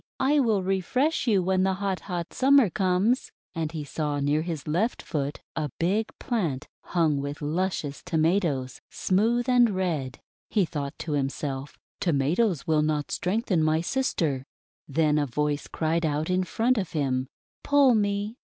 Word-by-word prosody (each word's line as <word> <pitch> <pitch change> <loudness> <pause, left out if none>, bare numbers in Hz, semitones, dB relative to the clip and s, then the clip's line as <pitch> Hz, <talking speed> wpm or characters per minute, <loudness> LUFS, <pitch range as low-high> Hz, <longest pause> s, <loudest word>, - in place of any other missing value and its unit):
I 290 +3 +3
will 220 -7 +2
refresh 250 - 0
you 200 -5 +3
when 185 +1 +2
the 190 0 +2
hot, 195 -1 -2
hot 175 -3 -5
Summer 270 -6 +5
comes! 195 +7 +1
' - - -78
And 160 -3 -2
he 155 -3 -4
saw 145 0 -2
near 145 +2 +1
his 160 -4 -5
left 185 +11 0
foot 145 -2 -3
a 155 -2 -2
big 205 +6 +1
plant 165 - -2
hung 160 -5 +1
with 140 +1 -5
luscious 155 -2 -2
Tomatoes, 160 -6 0
smooth 230 +6 +1
and 245 -2 +5
red. 170 -10 -2 0.3
He 205 -4 +2
thought 145 -3 -5
to 160 - -5
himself: 135 -1 -3
* - - -78
Tomatoes 170 - +1
will 155 -3 +2
not 150 -1 -1
strengthen 190 -2 0
my 155 +1 +2
sister." 165 - -1 0.4
Then 150 +1 +2
a 145 - 0
voice 150 +3 -1
cried 165 +1 -1
out 155 +2 0
in 185 0 +1
front 230 +5 +1
of 185 - -4
him: 130 -4 0 0.3
<:<Pull 285 -3 +5
me! 205 +1 0
170 Hz, 165 wpm, -26 LUFS, 150-205 Hz, 0.4 s, Summer